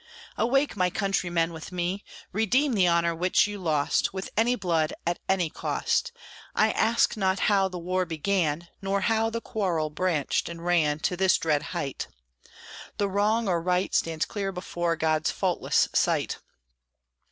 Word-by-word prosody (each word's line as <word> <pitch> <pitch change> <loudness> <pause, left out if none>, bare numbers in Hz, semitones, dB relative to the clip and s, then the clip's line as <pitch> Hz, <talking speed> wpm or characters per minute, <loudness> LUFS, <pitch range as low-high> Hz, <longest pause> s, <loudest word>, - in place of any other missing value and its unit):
Awake, 270 +6 +1
my 180 -2 +2
countrymen, 175 -4 0
with 160 +2 -8
me! 180 +3 -2 0.3
Redeem 245 +7 +2
the 190 -5 +3
honor 170 0 +2
which 180 +3 +3
you 205 -1 -5
lost. 155 -5 +1
With 190 - -5
any 235 +3 +3
blood, 165 -7 0
at 175 0 -1
any 190 -3 +2
cost! - - -1 0.4
I - - +4
ask 230 +1 +2
not 190 -2 0
how 195 -2 +3
the 185 -1 -6
war 180 +1 -1
began, 170 -1 -1
Nor 195 0 0
how 225 +2 +2
the 230 +1 -4
quarrel 170 -10 -1
branched 155 -3 0
and 170 0 -8
ran 160 -4 +2
To 180 - 0
this 190 0 +3
dread 150 -3 +1 0.2
height. 135 -2 -3 0.9
The 200 -1 0
wrong 210 +3 +1
or 175 -3 +1
right 180 +2 0
Stands 160 -1 +1
clear 200 -2 -3
before 175 -2 -2
God's 155 -1 +1
faultless - - +1
sight. - - +1
180 Hz, 155 wpm, -27 LUFS, 165-200 Hz, 0.9 s, I